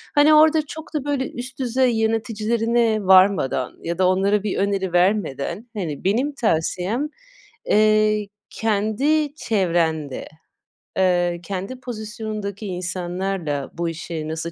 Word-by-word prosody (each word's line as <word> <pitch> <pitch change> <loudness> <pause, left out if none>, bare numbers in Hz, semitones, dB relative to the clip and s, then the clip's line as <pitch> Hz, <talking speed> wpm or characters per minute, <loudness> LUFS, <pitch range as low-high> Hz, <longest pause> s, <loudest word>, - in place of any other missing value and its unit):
hani, 295 +1 +6
orada 310 +1 +6
çok 315 +2 -9
da, 290 -2 -2
böyle, 280 -3 -1
üst 245 +2 -8
düzey 255 0 +2
yöneticilerine 225 0 +1
varmadan 185 -9 +4
ya 170 0 -3
da 185 0 +3
onlara 195 +2 +2
bir 205 - -2
öneri 195 -2 0
vermeden, 190 - 0
hani, 160 -8 -4
benim 245 +10 +1
tavsiyem, 215 - 0 0.6
eee, 215 0 +3 0.2
kendi 225 +8 0
çevrende, 170 - -1 0.7
ııı, 175 -2 +2
kendi 195 +7 -5
pozisyonundaki 215 -3 -5
insanlarla 180 -4 -3
bu 170 0 -2
işi 165 -1 -5
nasıl 160 +1 -4
205 Hz, 115 wpm, -22 LUFS, 180-235 Hz, 0.7 s, hani